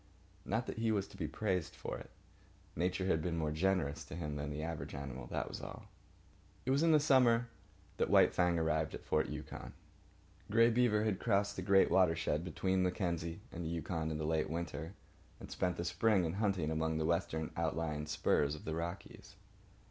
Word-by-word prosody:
Not 115 +4 0
that - - -5
he 115 -1 +2
was 100 -2 0
to - - -14
be 85 -5 -3
praised 95 -5 -2
for - - -5
it. - - -11 0.7
Nature 90 +3 0
had 80 -4 +2
been 85 0 -2
more 80 -2 0
generous 80 -3 0
to - - -8
him 75 -4 -4
than 75 0 -3
to 75 - -5
the 75 - -4
average 75 -3 -5
animal, 65 -3 -6
that - - -2
was - - -6
all. - - -9 0.8
It 130 - +1
was 140 +2 +3
in 165 0 +5
the 155 - +6
summer 125 -4 +4 0.5
that - - +1
White - - +6
Fang 90 -1 +2
arrived 80 -1 0
at - - -10
Fort - - +1
Yukon. - - -7 0.8
Grey 115 +2 +5
Beaver 115 -3 +3
had 105 -4 0
crossed 100 +1 +1
the - - -4
great 95 -1 +4
watershed 80 -4 +3
between 95 +2 0
Mackenzie 85 -1 -1
and 85 - -5
the 80 - -3
Yukon 80 -1 -2
in 80 - -2
the 75 - -3
late 80 -1 0
winter, 85 +1 -4 0.4
and - - -10
spent 90 -2 -1
the 85 - -3
spring 90 +2 +2
in 80 - -2
hunting 95 -6 0
among 80 0 0
the 80 - 0
western 80 -2 0
outlying 80 -2 -2
spurs 75 -1 +1
of 75 - -11
the 80 - -2
Rockies. 90 +4 -6
85 Hz, 200 wpm, -35 LUFS, 80-100 Hz, 0.8 s, the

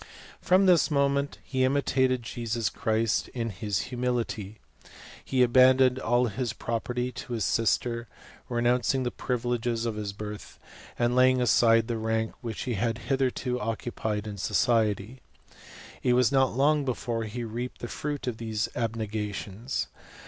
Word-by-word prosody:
From 185 +1 +4
this 180 -3 +5
moment 140 -1 +1
he 130 -1 -1
imitated 130 -2 +2
Jesus 115 -1 -2
Christ, 110 0 0
in 115 -2 -2
his 100 0 -2
humility. 120 -4 -2 0.7
He 130 -2 +2
abandoned 130 +1 +5
all 120 0 +2
his 120 +1 -2
property 125 +2 -2
to 125 - -7
his 110 -4 -1
sister, 115 +1 0 0.4
renouncing 125 +2 +1
the 120 - -1
privileges 120 -1 -1
of 115 - -1
his 105 -1 -3
birth, 105 +1 -8 0.4
and 120 0 +1
laying 130 0 +5
aside 115 -2 +4
the: 120 -2 -2
rank 110 0 -1
which 115 -4 -4
he 125 - -2
had 115 +2 -1
hitherto 125 0 -1
occupied 110 -1 -3
in 105 -2 -6
society. 110 +3 +1 0.3
■ - - -23 0.5
It 125 - +2
was 125 -2 +4
not 130 -3 +2
long 145 +2 +3
before 120 -3 -2
he 120 +3 -5
reaped 120 +3 -5
the 120 - -5
fruit 145 0 -4
of 125 -3 -3
these 110 -1 -2
abnega 110 -3 -2
tions. 110 +8 -4
120 Hz, 150 wpm, -27 LUFS, 110-130 Hz, 0.7 s, this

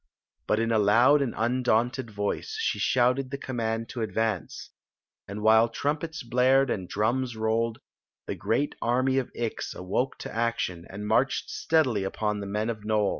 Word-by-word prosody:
But 105 - +2
in 115 0 0
a 110 - +3
loud 120 +8 +5
and 135 -4 -2
un 125 +3 0
^wmted 120 +1 +1
vmce 105 - -2
she 450 - -1
shouted 130 +1 +2
the 140 - -4
command 115 -4 -3
to 125 -3 -5
advance; 110 -2 -2 0.6
and 105 +1 -6
while 110 +1 +5
trumpets 150 +6 -3
blared 125 +2 +3
and 95 -3 -3
drums 120 +4 0
rolled, 110 +1 0 0.5
the - - -3
great 140 +6 -1
army 130 +3 +2
of 130 - -4
Ix 115 -2 -3
awoke 100 +8 -2
to - - -8
action 115 -7 -1
and 100 +2 -7
^^cked 110 +6 +1
steadily 130 -11 +1
upon 105 +2 -2
the 100 - -5
men 105 +3 -1
of 115 - -5
N«Je. 105 -1 +1
115 Hz, 170 wpm, -27 LUFS, 105-130 Hz, 0.6 s, loud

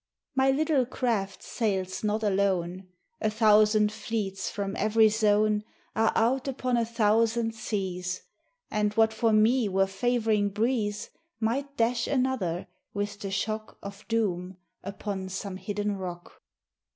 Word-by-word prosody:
My 265 0 +3
little 280 -2 +2
craft 225 -7 -2
sails 190 -4 -2
not 215 +1 0
alone: 190 -2 0 0.3
A 215 - +2
thousand 215 -1 +4
fleets 205 -4 -3
from 200 -1 -3
every 220 +1 +4
zone 210 0 +2 0.3
Are 220 0 +3
out 255 +5 +2
upon 255 -2 -1
a 230 -1 +1
thousand 225 0 +2
seas; 190 -5 -3 0.5
And 210 -1 0
what 220 0 +4
for 225 0 +2
me 220 +2 +4
were 195 0 +3
favoring 215 +1 +1
breeze 210 0 -1 0.3
Might 275 +5 -1
dash 235 +1 +1
another, 250 -11 0 0.3
with 205 0 -3
the 200 - -4
shock 215 +2 -3
Of 200 +1 -9
doom, 185 -5 -1 0.3
upon 195 0 -5
some 190 0 -5
hidden 205 0 -2
rock. 180 -2 -8
215 Hz, 130 wpm, -28 LUFS, 195-230 Hz, 0.5 s, thousand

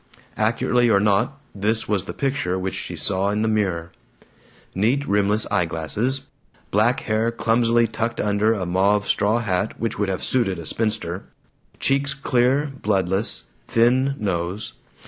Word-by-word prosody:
Accurately 120 +2 +2
or 100 -3 +5
not, 105 +7 +1
this 105 +3 0
was 100 -4 0
the - - -6
picture 130 -10 -1
she - - -5
saw 100 0 0
in 105 +1 0
the - - +1
mirror: 95 -6 -1 0.8
Neat 125 +9 +1
rimless 105 +1 +2
eye 100 -4 +2
glasses. 90 - -1 0.5
Black 110 +5 +2
hair 110 +1 0
clumsily 115 0 +2
tucked 115 +1 -3
under 105 +1 +2
a 100 -5 -1
mauve 100 +4 +2
straw 105 +2 +2
hat 100 -3 -1
which 115 -2 -2
would 105 -2 0
have 95 - -3
suited 115 -8 +1
a 85 - -7
spinster. 105 -3 -2 0.5
Cheeks 140 0 +1
clear, 135 +2 +1
bloodless. 95 0 0 0.2
Thin 130 +4 +3
nose. 95 - -3
105 Hz, 145 wpm, -22 LUFS, 95-120 Hz, 0.8 s, or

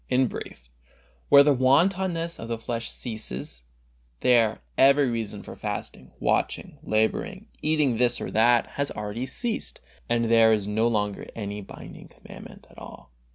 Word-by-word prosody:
In 130 +1 +3
brief, 60 - -8 0.6
where 140 0 +9
the 145 0 +4
wantonness 170 +6 +1
of 115 - -7
the 115 0 -3
flesh 115 0 -4
ceases, 70 - -5 0.6
there 115 -3 +3
every 140 +1 +5
reason 105 -3 -4
for - - -10
fasting, 65 - -6
watching, - - -1
laboring, 150 - -1
eating 150 -6 +1
this 120 0 +2
or - - -5
that, 120 +2 +4 0.2
has 140 - 0
already 105 +4 -5
ceased, 230 - -2 0.3
and 120 0 +1
there 115 -1 +5
no 105 +3 0
longer 105 -3 -1
is - - -10
any 105 -2 -5
binding 95 - -11
commandment - - -13
at - - -14
all. 60 -1 -12
115 Hz, 150 wpm, -25 LUFS, 110-140 Hz, 0.6 s, where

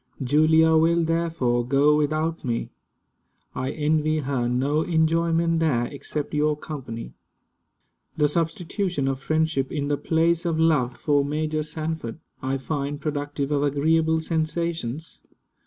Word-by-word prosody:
Julia 155 +4 +4
will 165 +1 +3
therefore 160 -7 0
go 140 +4 +3
without 155 +2 0
me. 120 -2 -2 0.8
I 130 +1 -3
envy 155 +1 +1
her 135 -4 -1
no 140 +5 +1
enjoyment 165 0 +2
there, 135 -7 +1
except 145 +2 -5
your 150 0 +1
company. 125 - -7 1.0
The 150 - +3
substitution 170 0 -1
of 135 -1 -1
friendship, 155 -2 0
in 145 -2 -2
the 145 - +1
place 165 +2 +1
of 165 -2 -1
love, 145 -7 +2
for 145 -2 +2
Major 155 +2 -1
Sanford, 155 -5 -4 0.2
I 135 +1 -1
find 140 +1 -3
productive 145 -1 -3
of 145 -1 +1
agreeable 160 +3 +2
sensations. 160 -3 -3
155 Hz, 125 wpm, -24 LUFS, 140-160 Hz, 1.0 s, Julia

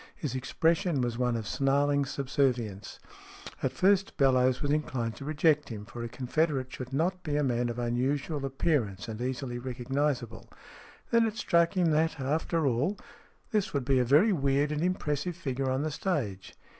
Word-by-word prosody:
His 145 -6 -4
expression 165 +4 +1
was 120 -1 -2
one 125 -1 +1
of 110 -2 -3
snarling 140 +2 +2
subservience. 125 -7 -1 0.6
At - - 0
first 195 +1 +2
Bellowes 130 -2 +3
was 145 - 0
inclined 130 -7 -1
to 140 - -8
reject 150 -1 +2
him, 105 -3 -6
for 120 +2 -8
a 115 - -4
confederate 130 +2 -1
should 130 0 -7
not 175 +7 0
be 150 -4 -2
a 150 - +2
man 120 -2 0
of 120 - -4
unusual 135 +5 -1
appearance 135 - -1
and 110 0 -6
easily 125 -1 -3
recognizable. 130 +1 -2 0.6
Then 230 -1 +4
it 220 0 -5
struck 170 -4 +2
him 175 -3 +3
that, 160 0 +1
after 155 +4 0
all, 140 - +1 0.5
this 210 -7 0
would 140 -3 0
be 135 -1 +3
a - - +3
very 150 - +5
weird 140 -1 +1
and 150 0 -1
impressive 170 -2 -1
figure 135 -5 -2
on 130 +2 0
the 155 - -2
stage. 135 - -3
140 Hz, 170 wpm, -29 LUFS, 125-155 Hz, 0.6 s, very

